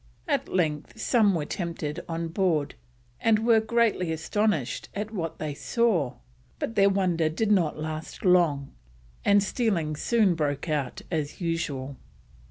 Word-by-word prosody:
At -, -, 0 dB
length 160 Hz, +2 st, -1 dB
some 215 Hz, -5 st, +3 dB
were 155 Hz, -3 st, -1 dB
tempted 165 Hz, -3 st, -4 dB
on 165 Hz, 0 st, -2 dB
board, 165 Hz, -5 st, 0 dB, 0.5 s
and 220 Hz, -1 st, +2 dB
were 230 Hz, -2 st, +6 dB
greatly 220 Hz, -6 st, +1 dB
astonished 160 Hz, -, -1 dB
at 210 Hz, +1 st, -3 dB
what 165 Hz, -6 st, -3 dB
they 150 Hz, -2 st, -3 dB
saw, 180 Hz, -, +1 dB, 0.4 s
but -, -, -3 dB
their 200 Hz, -2 st, +5 dB
wonder 180 Hz, -5 st, +1 dB
did 210 Hz, +7 st, 0 dB
not 175 Hz, -7 st, +2 dB
last 155 Hz, +3 st, -6 dB
long, 165 Hz, -7 st, +3 dB, 0.5 s
and 200 Hz, 0 st, +5 dB
stealing 190 Hz, -9 st, 0 dB
soon 210 Hz, +3 st, +2 dB
broke 145 Hz, -1 st, -2 dB
out 145 Hz, -5 st, -2 dB
as 155 Hz, -3 st, -2 dB
usual. 145 Hz, -6 st, -3 dB
170 Hz, 140 wpm, -27 LUFS, 155-205 Hz, 0.5 s, were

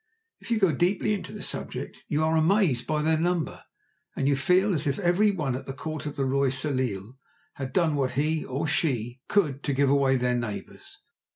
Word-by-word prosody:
If -, -, -12 dB
you 230 Hz, -, +2 dB
go 190 Hz, -5 st, +3 dB
deeply 180 Hz, +7 st, +1 dB
into 200 Hz, -, -4 dB
the -, -, -6 dB
subject -, -, -3 dB
you 150 Hz, +1 st, 0 dB
are 160 Hz, +1 st, +2 dB
amazed 160 Hz, -, +2 dB
by 155 Hz, -1 st, 0 dB
their 160 Hz, 0 st, +2 dB
number, 175 Hz, -1 st, -1 dB, 0.5 s
and 135 Hz, -, 0 dB
you 140 Hz, -, +3 dB
feel 180 Hz, +9 st, +3 dB
as 150 Hz, -, 0 dB
if 140 Hz, -, 0 dB
every 190 Hz, +3 st, +3 dB
one 150 Hz, -10 st, -1 dB
at 130 Hz, -, -7 dB
the 135 Hz, -, -4 dB
Court 155 Hz, +2 st, -5 dB
of 145 Hz, -, -5 dB
the 135 Hz, -, -1 dB
Roi 135 Hz, +1 st, +2 dB
Soleil 130 Hz, -4 st, -2 dB, 0.3 s
had 135 Hz, -2 st, -5 dB
done 165 Hz, -5 st, +2 dB
what 135 Hz, -3 st, 0 dB
he 155 Hz, +4 st, 0 dB
(or 135 Hz, +4 st, -3 dB
she) 125 Hz, -5 st, -1 dB
could 150 Hz, -9 st, +1 dB
to 145 Hz, -, -1 dB
give 135 Hz, 0 st, +2 dB
away 135 Hz, -2 st, +3 dB
their 125 Hz, 0 st, +1 dB
neighbours. 120 Hz, -4 st, -6 dB
145 Hz, 205 wpm, -26 LUFS, 130-165 Hz, 0.5 s, go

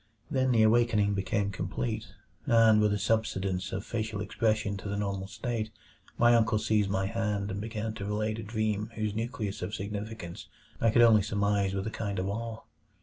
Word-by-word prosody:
Then 130 Hz, -2 st, +2 dB
the 115 Hz, -2 st, +5 dB
awakening 110 Hz, -2 st, +3 dB
became 100 Hz, +1 st, 0 dB
complete, 110 Hz, +3 st, -3 dB, 0.4 s
and 115 Hz, -3 st, +6 dB
with 105 Hz, -1 st, +3 dB
a 105 Hz, -, +1 dB
subsidence 95 Hz, -4 st, 0 dB
of 100 Hz, +2 st, -4 dB
facial 110 Hz, -2 st, -3 dB
expression 110 Hz, 0 st, 0 dB
to 100 Hz, -, -6 dB
the 100 Hz, -, -2 dB
normal 100 Hz, -2 st, -2 dB
state 110 Hz, +2 st, -3 dB, 0.5 s
my 120 Hz, 0 st, +5 dB
uncle 115 Hz, -1 st, +3 dB
seized 105 Hz, -1 st, +1 dB
my 95 Hz, 0 st, 0 dB
hand 105 Hz, -1 st, -1 dB
and 100 Hz, +1 st, -3 dB
began 110 Hz, 0 st, -3 dB
to 100 Hz, -2 st, -6 dB
relate 110 Hz, +2 st, -1 dB
a -, -, -5 dB
dream 110 Hz, 0 st, -1 dB
whose 110 Hz, -1 st, -1 dB
nucleus 110 Hz, -2 st, -3 dB
of 95 Hz, +4 st, -3 dB
significance 100 Hz, -3 st, -6 dB, 0.3 s
I 115 Hz, -, +3 dB
could 120 Hz, +2 st, +5 dB
only 110 Hz, -2 st, +7 dB
surmise 100 Hz, -1 st, 0 dB
with 95 Hz, 0 st, -2 dB
a 110 Hz, -, -3 dB
kind 100 Hz, -3 st, -3 dB
of 95 Hz, +1 st, -1 dB
awe. 110 Hz, +2 st, -4 dB
105 Hz, 185 wpm, -29 LUFS, 100-110 Hz, 0.5 s, only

